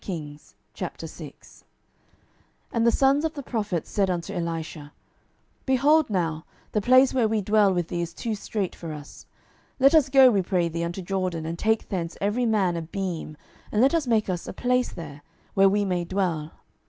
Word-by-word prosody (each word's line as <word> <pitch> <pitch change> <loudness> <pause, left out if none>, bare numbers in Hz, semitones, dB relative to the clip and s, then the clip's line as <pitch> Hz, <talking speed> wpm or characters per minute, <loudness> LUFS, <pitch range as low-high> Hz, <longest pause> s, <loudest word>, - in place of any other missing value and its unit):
12:006:001 150 -5 -9 1.1
And 230 0 +1
the - - +6
sons 275 +4 +3
of 320 -1 -2
the 285 - -6
prophets 205 - -3
said 195 -2 +1
unto 175 -2 -3
Elisha, 165 -3 -5 0.7
Behold 285 +4 +4
now, 165 -5 -1 0.3
the 210 - 0
place 255 +4 +5
where 245 -4 +2
we 220 0 0
dwell 205 0 +3
with 175 -2 -1
thee 175 - -2
is 170 -1 -4
too 225 +6 -4
strait 205 -2 -3
for 165 -2 -7
us. 150 -1 -11 0.5
12:006:002 - - -13
Let 275 +3 +6
us 310 -4 +5
go, 265 -1 +7
we 200 -3 +2
pray 180 -2 0
thee, 170 +1 -3
unto 175 +3 -4
Jordan, 185 -3 -2
and 165 +1 -5
take 220 0 0
thence 170 -3 -3
every 220 +5 0
man 195 -6 +2
a - - -2
beam, 170 -3 -5 0.3
and 210 - 0
let 265 +6 +4
us 325 -5 +1
make 225 -3 +2
us 180 -3 -3
a - - -5
place 250 +4 0
there, 150 -4 -9 0.3
where 195 0 +5
we 205 +1 +1
may 180 -2 -1
dwell. 170 -4 -2
195 Hz, 185 wpm, -25 LUFS, 170-230 Hz, 1.1 s, go